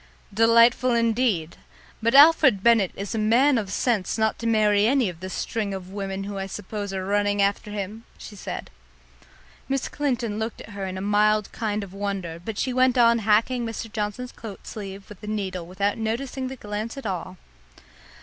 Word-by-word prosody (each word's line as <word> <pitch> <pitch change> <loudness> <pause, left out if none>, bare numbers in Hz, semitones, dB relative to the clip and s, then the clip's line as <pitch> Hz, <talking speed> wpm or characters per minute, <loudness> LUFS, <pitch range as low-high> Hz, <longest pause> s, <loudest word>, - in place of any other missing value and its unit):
"Delightful 230 +3 +5
indeed! 225 -8 +1 0.4
But 230 +3 +2
Alfred 280 -8 +7
Bennett 230 -6 +4
is 200 +2 -5
a 225 - -1
man 240 +5 +4
of 200 -4 -5
sense 220 -3 0
not 220 0 +1
to 230 - -3
marry 210 -2 +3
any 255 -4 +2
of 170 -2 -9
the 185 +1 -6
string 200 +1 -3
of 185 -1 -8
women 195 -1 -4
who 200 0 -5
I 195 - -3
suppose 205 +1 -5
are 190 -1 -3
running 205 +1 +1
after 200 +1 +1
him!" 210 +2 -5
she 210 - -10
said. 195 - -6 1.0
Miss 270 -1 -1
Clinton 245 -7 -2
looked 220 +1 -4
at - - -11
her 200 -1 -5
in 185 0 -5
a - - -4
mild 210 +1 +2
kind 210 -2 -2
of 190 -2 -10
wonder, 195 -4 -4
but 215 +1 -5
she 255 - -1
went 255 0 +3
on 235 -1 +5
hacking 225 +4 +2
Mr. 225 -1 -5
Johnson's 220 +4 -3
coat 210 -4 -10
sleeve 195 -2 -8
with 210 - -13
the 210 - -9
needle 190 -5 -3
without 200 +4 -1
noticing 255 +4 -3
the 265 - -6
glance 215 +2 -5
at 275 - -8
all. 185 -1 -4
210 Hz, 190 wpm, -24 LUFS, 195-230 Hz, 1.0 s, Alfred